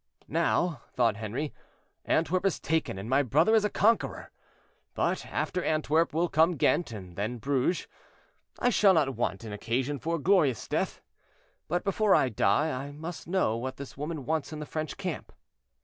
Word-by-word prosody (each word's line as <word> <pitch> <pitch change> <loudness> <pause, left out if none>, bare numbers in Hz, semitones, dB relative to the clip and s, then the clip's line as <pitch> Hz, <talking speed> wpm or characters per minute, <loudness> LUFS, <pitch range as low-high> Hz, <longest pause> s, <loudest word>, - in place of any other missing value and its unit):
"Now," 165 -2 +1
thought 115 -4 +2
Henri, 115 +8 -4 0.5
"Antwerp 165 +4 +1
is 195 -5 +1
taken, 160 -10 -1
and 100 +3 -6
my 135 +3 +3
brother 150 - +3
is 220 -2 +5
a 210 - +1
conqueror; 225 +3 +1 0.6
but - - -1
after 180 -1 -2
Antwerp 155 +1 +2
will 165 +3 +1
come 165 +2 +3
Ghent, 160 +1 +2
and 95 -5 -9
then 110 +6 -2
Bruges; 140 +7 0 0.7
I 245 - +2
shall 195 -5 +5
not 140 -4 +2
want 110 -3 -2
an 110 -2 -6
occasion 125 +7 -2
for 165 +4 -1
a - - -3
glorious 150 - +2
death. - - -2 0.7
But 175 +3 -1
before 200 0 +3
I 130 - +3
die 115 +8 +2
I 135 +2 -5
must 160 +4 -7
know 175 - +1
what 130 +2 -5
this 140 -1 -8
woman 150 -1 -5
wants 160 +2 -1
in 155 - -5
the 150 - -5
French 155 0 -4
camp." 185 -5 -5
150 Hz, 175 wpm, -29 LUFS, 125-175 Hz, 0.7 s, is